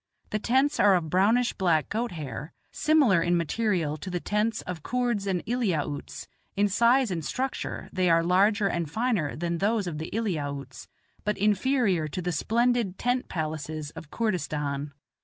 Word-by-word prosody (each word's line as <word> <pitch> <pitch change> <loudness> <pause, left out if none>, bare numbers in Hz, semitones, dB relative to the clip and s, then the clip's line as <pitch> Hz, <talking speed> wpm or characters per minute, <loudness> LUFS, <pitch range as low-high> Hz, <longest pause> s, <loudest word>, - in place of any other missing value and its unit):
The 215 - 0
tents 265 +6 +2
are 200 -2 +6
of 160 -4 -1
brownish 225 +7 +3
black 170 -5 +1
goat 230 -1 -2
hair, 145 -1 -6 0.2
similar 280 - +3
in 175 +1 +2
material 170 -3 0
to 170 - -7
the 175 -1 -2
tents 210 +4 -1
of 180 -3 -6
Koords 240 -1 -1
and 185 -3 -1
Eliautes; 180 - -2 0.3
in 205 +1 +2
size 235 +3 +3
and 165 -3 -2
structure 260 - -3
they 185 -1 +2
are 165 0 +4
larger 200 +4 +3
and 170 -5 -1
finer 220 - 0
than 170 +1 -2
those 210 +1 +1
of 160 -4 -4
the 160 - -5
Eliautes, 145 - -3 0.4
but 210 - -1
inferior 210 - +2
to 155 - -5
the 180 0 -2
splendid 230 +4 +1
tent 250 +1 -1
palaces 155 -2 -4
of 150 - -10
Koordistan. 150 -10 -2
185 Hz, 160 wpm, -27 LUFS, 160-225 Hz, 0.4 s, are